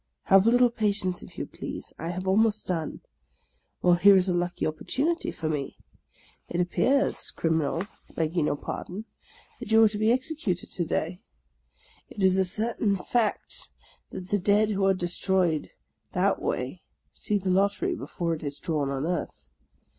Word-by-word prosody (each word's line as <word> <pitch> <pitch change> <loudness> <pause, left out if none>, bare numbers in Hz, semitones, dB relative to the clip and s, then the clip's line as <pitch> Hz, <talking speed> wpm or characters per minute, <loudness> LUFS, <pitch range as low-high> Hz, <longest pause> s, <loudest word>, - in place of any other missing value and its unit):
Have 195 +2 +5
a - - +8
little 245 0 +5
patience, 205 -5 0
if - - -13
you - - -3
please; - - -7
I 165 - -4
have 185 +2 -4
almost 215 +2 +3
done. 165 -4 -3 0.8
Well, 180 - +6
here 195 +3 +7
is 190 0 +4
a 180 - +1
lucky 175 0 -1
opportunity 290 - -1
for 160 - -4
me. 150 -3 -3 0.7
It 175 - -2
appears, 255 +10 +1
Crim 160 -1 0
84 140 - 0
THE - - -2
LAST 175 - -2
DAY - - -24
inal, - - -25
begging 160 0 0
your - - +1
pardon, 185 +7 -6 0.5
that - - -7
you 225 0 +7
are - - +8
to 210 0 -3
be 215 +1 +3
executed 255 - -1
to 175 - -1
day. 170 +3 -2 0.9
It 200 - -5
is 190 0 +4
a 190 - +3
certain 210 +2 0
fact 215 +3 -1 0.4
that 185 0 -8
the 205 - +2
dead 205 +3 +3
who 195 -1 +1
are 195 0 +4
destroyed 175 -2 0 0.4
that - - +1
way 130 +8 -3 0.3
see 210 - 0
the 190 -1 -1
lottery 200 - +2
before 170 - -3
it 160 - -5
is 145 -1 -4
drawn 150 -4 -1
on 135 +1 -2
earth. 170 - -4
185 Hz, 180 wpm, -27 LUFS, 170-215 Hz, 0.9 s, a